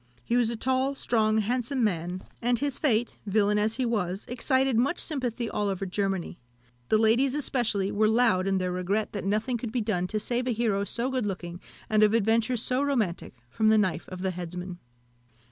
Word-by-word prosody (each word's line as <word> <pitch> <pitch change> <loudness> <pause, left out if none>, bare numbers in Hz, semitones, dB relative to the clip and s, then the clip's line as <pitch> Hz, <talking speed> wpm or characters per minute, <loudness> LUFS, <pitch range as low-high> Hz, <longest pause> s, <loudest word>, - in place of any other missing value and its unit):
He 235 - -1
was 240 -2 +3
a 235 - -2
tall, 260 +4 0
strong, 220 -4 +1
handsome 245 +4 0
man, 180 -2 -1 0.2
and 240 +1 +2
his 280 +1 -2
fate, 240 -5 +1
villain 210 +1 +2
as 215 +2 +1
he 255 - -1
was, 200 -5 -1
excited 260 +1 +1
much 260 +9 +1
sympathy 245 -6 -1
all 210 -2 -1
over 195 0 -2
Germany. 190 -2 -2 0.5
The 215 - +4
ladies 240 +5 +3
especially 235 -9 0
were 215 +1 +2
loud 220 -5 +3
in 195 0 +2
their 185 -1 -1
regret 185 +4 -1
that 200 -2 -4
nothing 215 +5 0
could 225 -1 -5
be 245 - -1
done 190 -5 -1
to 215 +3 -2
save 245 +3 -2
a 245 - +1
hero 210 -3 0
so 235 +6 -2
good 255 -5 -1
looking, 175 -2 -5 0.3
and 215 0 +2
of 215 +1 +5
adventures 230 +2 +1
so 255 +1 0
romantic, 230 - -1
from 215 - +1
the 220 - +5
knife 190 -6 0
of 185 0 -7
the 190 - 0
headsman. 180 0 -6
220 Hz, 195 wpm, -27 LUFS, 195-245 Hz, 0.5 s, of